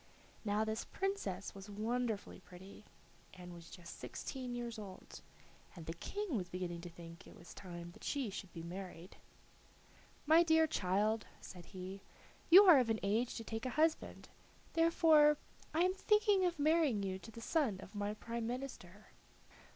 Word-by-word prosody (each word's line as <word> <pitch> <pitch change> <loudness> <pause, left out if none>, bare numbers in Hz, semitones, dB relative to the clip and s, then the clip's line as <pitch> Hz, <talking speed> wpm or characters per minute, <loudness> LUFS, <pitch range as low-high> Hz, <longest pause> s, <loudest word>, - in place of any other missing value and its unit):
Now 210 0 +1
this 220 +1 -2
princess 210 - -3
was 195 +1 -10
wonderfully 220 +1 -2
pretty 190 +3 -13 0.5
and 180 -1 -10
was 170 -1 -12
just 170 -2 -10
sixteen 255 -2 -5
years 235 -2 -5
old, 195 -3 -10 0.5
and 165 -3 -9
the 165 - -4
King 400 - -4
was 180 -5 -2
beginning 175 -1 -4
to 175 - -7
think 170 0 -12
it - - -13
was 170 - -12
time 175 -2 -8
that - - -16
she 270 -8 -1
should 190 -2 -7
be 165 -1 -8
married. 180 0 -8 1.1
"My 320 +3 +7
dear 320 -1 +5
child," 210 -3 0
said 180 -2 -10
he, 190 +1 -7 0.5
"you 370 +4 +11
are 350 -8 +9
of 245 -3 +1
an 220 -1 +1
age 220 +5 +1
to 225 - -5
take 225 +3 -4
a 255 - -5
husband, 315 +1 +1 0.5
therefore 320 -2 +5 0.3
I 320 - +1
am 365 +1 +3
thinking 415 -1 +3
of 350 -2 0
marrying 300 -8 +3
you 190 -1 -3
to 180 - -11
the 225 - -10
son 230 - 0
of 195 - -11
my 205 0 -2
prime 230 +1 -4
minister. 235 -6 -7
220 Hz, 165 wpm, -36 LUFS, 185-295 Hz, 1.1 s, you